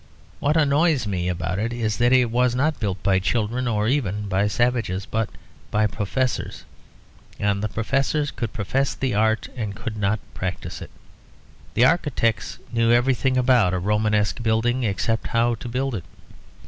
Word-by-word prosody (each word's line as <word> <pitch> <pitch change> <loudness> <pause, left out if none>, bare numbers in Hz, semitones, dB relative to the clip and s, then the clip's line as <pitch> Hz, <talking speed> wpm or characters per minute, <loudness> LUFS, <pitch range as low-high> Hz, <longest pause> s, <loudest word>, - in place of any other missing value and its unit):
What 150 +3 +2
annoys 150 -2 +3
me 90 -3 -1
about 90 +1 -2
it 115 +2 -1
is 110 -3 -1
that 120 +1 +3
it 125 -3 +4
was 125 0 +2
not 150 +4 +1
built 100 -4 -3
by 95 -1 +3
children, 120 +5 -1
or 105 -2 0
even 105 -6 0
by 100 +1 +1
savages, 110 -4 0
but 110 -1 -1 0.4
by 105 +1 +2
professors; 120 +5 -2 0.7
and 100 -1 0
the 105 - -1
professors 135 +7 0
could 115 -3 -4
profess 130 +5 -1
the 130 -3 -1
art 110 +1 +1
and 105 -5 -4
could 110 -2 -5
not 105 +1 +1
practise 95 -1 -5
it. - - -8 0.9
The 120 - +5
architects 125 - +1 0.2
knew 115 0 +3
everything 130 +1 +2
about 120 -8 +4
a - - 0
Romanesque 105 +3 +1
building 120 +3 +1
except 110 +1 -1
how 115 +1 +2
to 120 +1 -6
build 130 +2 -1
it. 95 -7 -4
115 Hz, 160 wpm, -23 LUFS, 105-125 Hz, 0.9 s, The